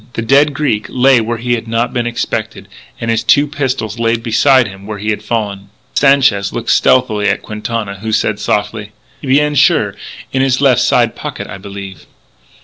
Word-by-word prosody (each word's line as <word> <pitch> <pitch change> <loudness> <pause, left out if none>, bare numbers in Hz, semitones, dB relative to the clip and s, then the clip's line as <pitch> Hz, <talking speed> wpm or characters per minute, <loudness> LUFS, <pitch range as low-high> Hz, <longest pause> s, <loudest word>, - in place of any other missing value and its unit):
The 115 - -3
dead 140 +4 +3
Greek 110 -9 -1
lay 130 +1 +4
there 115 - +1
where 115 +1 -3
he 120 +2 -1
had 115 -1 -3
not 115 +2 -1
been 120 -2 -1
expected, 120 - -4 0.3
and 115 0 -2
his 115 0 0
two 145 - +4
pistols 130 -7 -3
lay 115 0 +2
beside 120 +2 +3
him 95 0 -11
where 105 -1 -6
they 105 +1 -1
had 105 - -3
fallen. 105 -3 -3 0.2
Sanchez 130 -8 +3
looked 120 - -2
stealthily 110 -5 +2
at - - -1
Quintana, 105 -2 -5
who 110 +2 -4
said 105 -1 0
softly: 105 +1 -2 0.3
"Bien 145 +2 +2
sure.... 145 - +3 0.4
In 130 - +1
his 130 -1 +1
left 135 -5 +3
side - - +2
pocket, - - -6
I 95 - -9
believe." 100 -1 -9
115 Hz, 185 wpm, -14 LUFS, 105-130 Hz, 0.4 s, lay